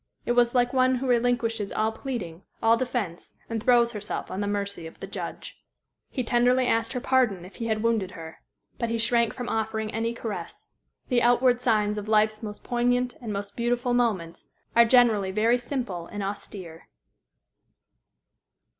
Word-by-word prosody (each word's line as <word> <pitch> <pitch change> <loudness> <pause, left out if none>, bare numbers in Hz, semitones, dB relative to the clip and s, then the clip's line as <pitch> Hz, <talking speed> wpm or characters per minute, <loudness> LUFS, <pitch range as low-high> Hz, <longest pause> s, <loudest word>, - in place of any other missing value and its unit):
It - - 0
was 240 0 +3
like 245 0 +3
one 255 0 +4
who 255 +2 -3
relinquishes 235 -3 +1
all 220 +1 0
pleading, 220 - -5 0.2
all 225 0 +6
defence, 230 -8 -3 0.2
and 225 -1 -2
throws 235 0 +4
herself 210 -2 -5
on 190 - -3
the 205 - -1
mercy 200 -4 -3
of 160 - -14
the - - -5
judge. - - -7 0.5
He 255 - -2
tenderly 245 +2 +3
asked 225 0 +1
her 250 - -1
pardon 240 -9 +1
if 185 - -13
he 230 - -3
had 220 -1 -1
wounded 225 -5 +1
her. 160 0 -10 0.4
But 235 - -1
he 230 - 0
shrank 230 0 +2
from 245 -2 -6
offering 220 -1 -2
any 230 +1 -1
caress. 225 -3 -6 0.4
The 245 -2 +3
outward 245 +1 +4
signs 210 -3 +1
of 210 - -8
life's 215 0 +2
most 210 -2 -7
poignant 245 +1 +1
and 225 -3 -5
most 200 0 -5
beautiful 245 +1 0
moments 205 -9 -1 0.3
are 235 0 +7
generally 230 -5 +4
very 225 +5 +2
simple 240 -9 -4
and 205 -1 -5
austere. 195 -4 -7
230 Hz, 170 wpm, -26 LUFS, 205-245 Hz, 0.5 s, are